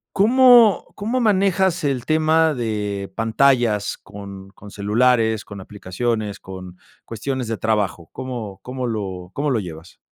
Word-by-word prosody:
¿Cómo 240 -1 +6
cómo 225 +5 -2
manejas 190 -5 +2
el 135 -4 -1
tema 160 +1 +3
de 105 -5 -3
pantallas 115 -2 +2
con 100 -1 -11
con 100 +1 -14
celulares, 110 +2 +1
con 100 - -10
aplicaciones, 105 +2 -3
con 95 -1 -10 0.3
cuestiones 125 +2 -4
de 115 0 -3
trabajo? 105 -7 -1
¿Cómo 115 -7 -6
cómo 125 +2 -5
lo 95 -6 -5
cómo 145 +1 -1
lo 125 - +1
llevas? 85 -3 -9
115 Hz, 130 wpm, -21 LUFS, 100-145 Hz, 0.3 s, Cómo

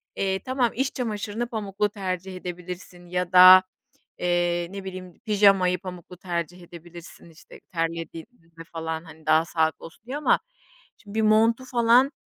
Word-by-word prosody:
Eee, 190 -1 -1
tamam, 255 +1 0
iç 265 +2 -1
çamaşırını 225 -1 -3
pamuklu 210 -3 -2
tercih 190 -2 -5
edebilirsin 180 0 -8
ya 180 0 -2
da, 185 0 +9 0.6
eee, 175 -1 0
ne 195 0 -8
bileyim, 185 -2 -8
pijamayı 195 -4 +4
pamuklu 180 -1 -10
tercih 175 0 -5
edebilirsin, 170 0 -13
işte, 160 - -16
terlediğimizde 165 +1 -6
falan, 160 0 -4
hani, 160 -1 -15
daha 155 +1 +4
sağlıklı 160 -1 -1
olsun 165 +6 -17
diye 260 +3 -5
ama 300 - +2 0.6
şimdi 205 -2 -13
bir - - +1
montu 225 +3 +3
falan 245 +2 +3
185 Hz, 140 wpm, -25 LUFS, 170-210 Hz, 0.6 s, da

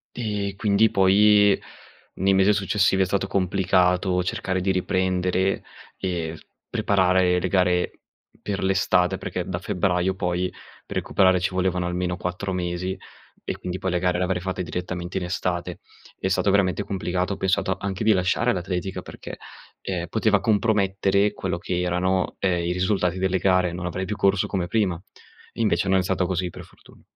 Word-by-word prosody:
Ehm, 105 -4 -3
quindi, 105 +1 +3
poi 100 +1 +5 0.6
nei 95 +1 +2
mese 95 +2 +4
successivi 95 -1 +2
è - - +1
stato 95 +1 -1
complicato 90 -1 +2
cercare 95 -2 -2
di 95 +1 +1
riprendere 95 0 0 0.3
e 85 -3 -3
s 80 - -16 0.2
preparare 90 -2 +2
le 95 - -1
gare 90 -1 +2 0.5
per 100 -2 -3
l'estate. 95 -1 +2
Perché 90 -1 -4
da 90 -2 -3
febbraio 90 -1 0
poi, 90 -1 -1 0.3
per - - -5
recuperare 95 -2 +3
ci 90 - 0
volevano 90 -1 0
almeno 90 0 -2
4 90 +2 -3
mesi 90 +1 -3 0.5
e - - -4
quindi, 90 0 -5
poi 95 - -2
le 90 - +1
gare 90 -1 +1
le 90 - 0
avrei 90 -1 -1
fatte 95 -1 -3
direttamente 90 +1 -4
in 90 - -2
estate. 90 -1 -3 0.4
È 95 - -1
stato 95 +1 +1
veramente 95 -2 +2
complicato. 95 0 -2
Ho - - -6
pensato 95 0 0
anche 100 +1 -3
di 110 0 +5
lasciare 95 +6 +1
l'atletica, 90 +1 -3
perché, - - -9 0.4
ehm, 90 -2 -3
poteva 110 0 +2
compromettere 100 -2 +2
quello 90 -2 -3
che 90 +1 -3
erano, 90 +1 0
ehm, 90 -3 +1
i 85 - 0
risultati 90 -1 0
delle 95 0 +1
gare, 90 -1 +2
non 90 0 -5
avrei 95 +2 -3
più 105 - -3
corso 100 -1 +2
come 90 -3 -2
prima. 95 -4 0 0.5
Invece 100 -5 +1
non 95 - +4
è - - 0
stato 95 0 0
così, 90 0 -1
per - - -10
fortuna. - - -20
95 Hz, 170 wpm, -24 LUFS, 90-95 Hz, 0.6 s, poi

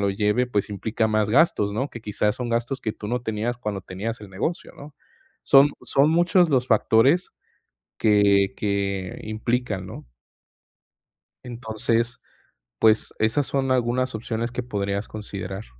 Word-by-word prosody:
lo 100 - +1
lleve, 105 +5 +1
pues 105 -4 -1
implica 110 +2 -1
más 110 -1 +1
gastos, 115 -7 +3
¿no?, 130 +7 -2
que 115 - -9
quizás 105 +1 -1
son 125 -1 -4
gastos 120 +3 -1
que 110 - -2
tú 105 -1 -8
no 125 +1 -2
tenías 115 +2 -2
cuando 105 -5 -4
tenías 105 +6 -5
el 105 -2 -11
negocio, 105 - -4
¿no?, 145 +1 -12 0.5
son 140 +1 +6
son 140 +2 +3
muchos 175 +1 +3
los 130 -3 +2
factores 120 - +3 0.7
que 100 -2 +3
que 100 -2 -2
implican, 110 -2 -2
¿no? - - -10 1.4
Entonces, 115 0 -2 0.6
pues 110 -1 +3
esas 115 +6 +1
son 135 -1 -1
algunas 130 0 0
opciones 115 +1 -3
que 125 - -3
podrías 100 -3 -3
considerar. 100 -2 -6
110 Hz, 145 wpm, -24 LUFS, 105-125 Hz, 1.4 s, son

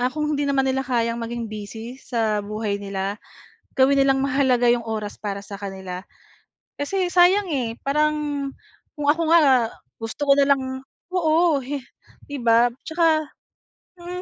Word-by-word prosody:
ah, 250 - +2
kung 300 +1 -1
hindi 290 0 0
naman 270 -1 +2
nila 265 0 +1
kayang 235 -2 0
maging 235 0 -4
busy 220 +4 -7
sa 220 -5 0
buhay 210 -1 -3
nila, 195 0 -3 0.6
gawin 270 +1 +5
nilang 270 0 +3
mahalaga 260 -3 +2
'yong 240 -1 +1
oras 215 -2 -4
para 200 -2 -4
sa 200 - -8
kanila. 190 -2 -6 0.8
Kasi 360 +5 -1
sayang, 365 +2 +4
eh, 245 -6 -1
parang 300 +2 +2 0.8
kung 295 -2 -3
ako 330 +3 +1
nga, 335 - +7 0.6
gusto 225 +6 -4
ko - - +9
na 280 - +5
lang 270 - -5 0.5
oo, 330 -3 +3
hi 275 +1 -4 0.5
'di 285 - -4
ba, 235 +1 +5 0.2
'tsaka, 320 -1 +2 0.7
mm, 360 +1 -6
260 Hz, 150 wpm, -23 LUFS, 225-300 Hz, 0.8 s, ko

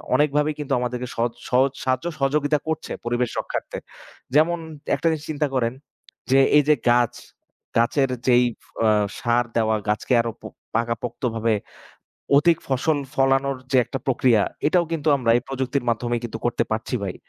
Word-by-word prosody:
অনেকভাবেই 150 +1 +2
কিন্তু 140 -2 -2
আমাদেরকে 125 0 -3
সহজ 115 0 0 0.2
সহজ 130 +2 +3
সাহায্য, 130 +2 0
সহযোগিতা 145 +1 +1
করছে 160 - -3
পরিবেশ 120 0 0
রক্ষার্থে। - - -4 0.6
যেমন 170 +3 +4 0.4
একটা - - -1
জিনিস 155 -2 -3
চিন্তা 150 0 0
করেন 115 -2 +1 0.6
যে 135 - +6 0.2
এই 150 - +5
যে 150 - +6
গাছ, 120 -1 +3 0.6
গাছের 130 +3 +2 0.2
যেই 125 0 +5 0.4
আ - - +5 0.3
ষাঁড় 120 0 +1
দেওয়া 110 -1 +2
গাছকে, 105 +4 0
আরো 115 0 -3
পো - - -7 0.3
পাকাপোক্তভাবে 115 0 -1 0.9
অধিক 165 +2 +3
ফসল 140 +3 +1 0.2
ফলানোর 135 0 +2 0.2
যে - - +4
একটা 135 - -5
প্রক্রিয়া, 120 -4 +3 0.2
এটাও 170 +3 +3
কিন্তু 160 -1 -1
আমরা 125 -4 0
এই 120 - -1
প্রযুক্তির 135 -1 -2
মাধ্যমেই 120 +1 0
কিন্তু 115 -1 -5
করতে 120 0 0
পারছি 110 +3 -2
ভাই। 95 - -3
130 Hz, 155 wpm, -23 LUFS, 120-145 Hz, 0.9 s, যে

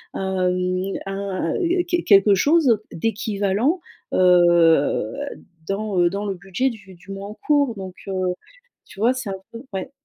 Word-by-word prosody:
hem, 185 0 -1
un, 195 -3 -3
heu, 350 +1 +1
qu 350 0 +1
quelque 200 0 +6
chose 270 - +3
d'équivalent, 215 - 0 0.3
heu, 175 -4 +4 0.5
dans, 200 -1 -2
heu, 175 - +4
dans 200 +1 -3
le 195 - -2
budget 195 +8 -1
du 205 -5 -11
du 180 +3 -20
mois 195 +1 -6
en - - -7
cours, 285 +1 +1
donc, 190 -2 -8
heu, 185 -2 -1 0.5
tu - - -16
vois, 235 +4 +4
c'est 255 -4 -5
un - - -3 0.2
peu 230 +2 -8
ouais. 190 +7 -4
195 Hz, 155 wpm, -22 LUFS, 185-230 Hz, 0.5 s, quelque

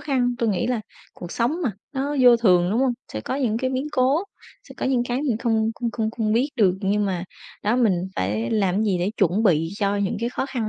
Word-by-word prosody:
khăn, 250 -4 0
tui 230 - +1
nghĩ 195 -4 0
là 245 -3 0 0.3
cuộc 175 -1 -8
sống 245 +7 0
mà 255 - +1 0.2
nó 280 +2 -2
vô 245 -1 +7
thường, 180 -6 +3
đúng 225 - +1
hông? 265 -2 +2 0.2
Sẽ 110 - -3
có 260 - -4
những 240 -6 0
cái 260 +1 -1
biến 260 +2 -2
cố, 270 +8 +2 0.4
sẽ - - -11
có - - -1
những 260 -2 +2
cái 250 +3 -1
mình 260 -7 0
không 225 -2 +1
không 235 0 -3
không 225 -2 -2
không 220 -2 -1
biết 245 +6 +2
được, 195 -5 +4
nhưng 205 +1 +1
mà, 185 -3 -2 0.4
đó, 215 +4 +1
mình 190 -7 +1
phải 105 +5 -1
làm 195 -4 +1
cái 215 +3 +1
gì 195 -4 +1
để 180 +3 0
chuẩn 195 +2 +2
bị 165 -6 +3
cho 200 -1 +1
những 200 +2 -1
cái 235 - 0
khó 265 - -2
khăn 245 -5 -3
225 Hz, 255 wpm, -23 LUFS, 195-250 Hz, 0.4 s, vô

